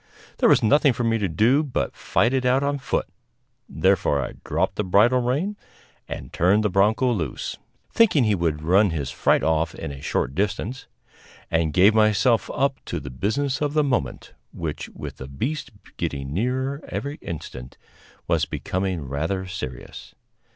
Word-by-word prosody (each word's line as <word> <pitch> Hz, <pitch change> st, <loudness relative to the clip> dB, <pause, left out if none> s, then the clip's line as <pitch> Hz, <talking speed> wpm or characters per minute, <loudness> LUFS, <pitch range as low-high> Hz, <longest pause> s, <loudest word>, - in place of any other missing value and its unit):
There -, -, +5 dB
was -, -, +5 dB
nothing 140 Hz, +4 st, +4 dB
for 120 Hz, -, -3 dB
me 115 Hz, -1 st, +1 dB
to 100 Hz, -3 st, 0 dB
do 115 Hz, -, +3 dB
but 130 Hz, -, -2 dB
fight 115 Hz, +8 st, +1 dB
it 130 Hz, -1 st, +1 dB
out 130 Hz, +2 st, +3 dB
on 145 Hz, 0 st, 0 dB
foot; 135 Hz, -, -1 dB, 0.6 s
therefore 70 Hz, -, +2 dB
I 65 Hz, -, -3 dB
dropped -, -, -1 dB
the 105 Hz, -, +1 dB
bridle 110 Hz, +7 st, +4 dB
rein 150 Hz, +13 st, -1 dB, 0.5 s
and -, -, -7 dB
turned 100 Hz, +5 st, +3 dB
the 105 Hz, -, +1 dB
bronco 110 Hz, +6 st, +3 dB
loose 80 Hz, -, -4 dB, 0.3 s
(thinking 205 Hz, -, +4 dB
he 110 Hz, -2 st, +2 dB
would 80 Hz, -5 st, -1 dB
run 95 Hz, +5 st, +4 dB
his 75 Hz, -5 st, -3 dB
fright 70 Hz, -, +2 dB
off 80 Hz, 0 st, +1 dB
in -, -, -6 dB
a 70 Hz, -1 st, -9 dB
short 65 Hz, -, -1 dB
distance), 105 Hz, -, -2 dB, 0.6 s
and 80 Hz, -1 st, +1 dB
gave 95 Hz, +7 st, +5 dB
myself 110 Hz, +2 st, +3 dB
up 140 Hz, 0 st, 0 dB
to -, -, -3 dB
the 65 Hz, -, -8 dB
business 130 Hz, -, -1 dB
of 145 Hz, -1 st, 0 dB
the 150 Hz, -, +4 dB
moment, 125 Hz, -, -2 dB, 0.2 s
which, 80 Hz, -3 st, -5 dB
with -, -, -8 dB
the 65 Hz, -, -8 dB
beast 130 Hz, -, -3 dB, 0.3 s
getting 70 Hz, 0 st, -3 dB
nearer 130 Hz, -, -1 dB
every 145 Hz, +2 st, -4 dB
instant, 70 Hz, -6 st, -8 dB, 0.5 s
was -, -, +2 dB
becoming 95 Hz, -2 st, -3 dB
rather 80 Hz, +8 st, -2 dB
serious. 90 Hz, -10 st, -8 dB
105 Hz, 165 wpm, -24 LUFS, 80-130 Hz, 0.6 s, There